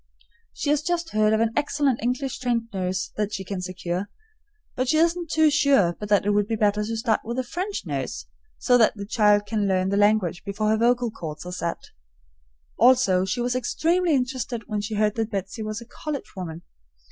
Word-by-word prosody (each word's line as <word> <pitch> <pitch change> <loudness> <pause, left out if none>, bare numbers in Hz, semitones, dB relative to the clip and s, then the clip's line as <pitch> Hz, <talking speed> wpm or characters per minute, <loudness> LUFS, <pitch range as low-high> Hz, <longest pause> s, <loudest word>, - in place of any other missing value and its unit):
She 290 - -2
has 295 -1 +2
just 340 +1 -2
heard 215 0 +3
of 220 0 +2
an 225 0 +1
excellent 285 -4 +1
English 250 +3 -2
trained 235 -2 -1
nurse 185 -1 -2
that 210 -1 -1
she 190 - -5
can 190 -1 -5
secure, 185 +1 -4 0.7
but 255 0 -1
she 310 - +3
isn't 335 +1 +1
sure 280 - +4
but 210 - -6
that 205 -1 +3
it 205 - +2
would 205 0 +2
be 225 - -1
better 210 -1 +1
to 225 +2 -3
start 225 -1 +1
with 235 +2 -4
a 260 - 0
French 370 +10 -4
nurse, - - -4 0.3
so 245 -1 +3
that 225 - +4
the 200 -1 -6
child 210 -1 +3
can 210 -1 -1
learn 185 -1 +1
the 200 - 0
language 205 -4 +2
before 205 +1 -1
her 220 - +3
vocal 240 +1 +2
cords 160 -5 -7
are 180 - -6
set. 170 -2 -4 0.9
Also, 240 -7 +5
she 190 +6 -2
was 245 +1 0
extremely 330 +6 +1
interested 250 -2 -2
when 210 -2 -2
she 215 +1 -4
heard 210 0 +2
that 225 -1 -1
Betsy 195 +2 -4
was 215 +1 -4
a - - -10
college 285 +2 -6
woman. 170 -3 -6
220 Hz, 205 wpm, -24 LUFS, 200-255 Hz, 0.9 s, Also